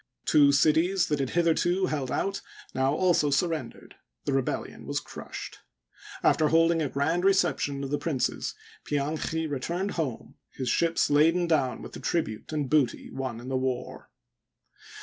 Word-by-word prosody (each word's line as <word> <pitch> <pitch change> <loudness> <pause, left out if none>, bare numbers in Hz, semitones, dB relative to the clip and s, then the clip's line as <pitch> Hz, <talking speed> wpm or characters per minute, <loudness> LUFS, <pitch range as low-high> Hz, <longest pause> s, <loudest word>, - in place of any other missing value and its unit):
Two 145 -2 +5
cities 160 +6 +3
that 150 -1 0
had 135 -2 -1
hitherto 175 +2 +2
held 145 -7 -2
out 195 +8 -1 0.3
now 130 +1 +1
also 175 -4 +3
surrendered— 155 -2 -2 0.3
the 140 - 0
rebellion 135 -2 -2
was - - -1
crushed. - - -9 0.6
After 155 - +4
hold 165 +2 +4
ing 165 -1 +1
a 145 - -1
grand 160 +7 0
reception 165 -7 +1
of 135 - -5
the 145 - 0
princes, 135 -7 -2 0.3
Pianchi 155 +2 -2
returned 170 +7 -2
home, 140 -9 -4
his 130 -2 -4
ships 165 +4 +2
laden 165 +4 +4
down 145 -7 0
with - - -8
the - - -7
tnbute 155 -10 -2
and 150 -3 -1
booty 140 -4 +1
won 130 -4 -4
in 120 - -10
the 130 - -1
war. 130 -1 -3
150 Hz, 155 wpm, -27 LUFS, 135-170 Hz, 0.6 s, Two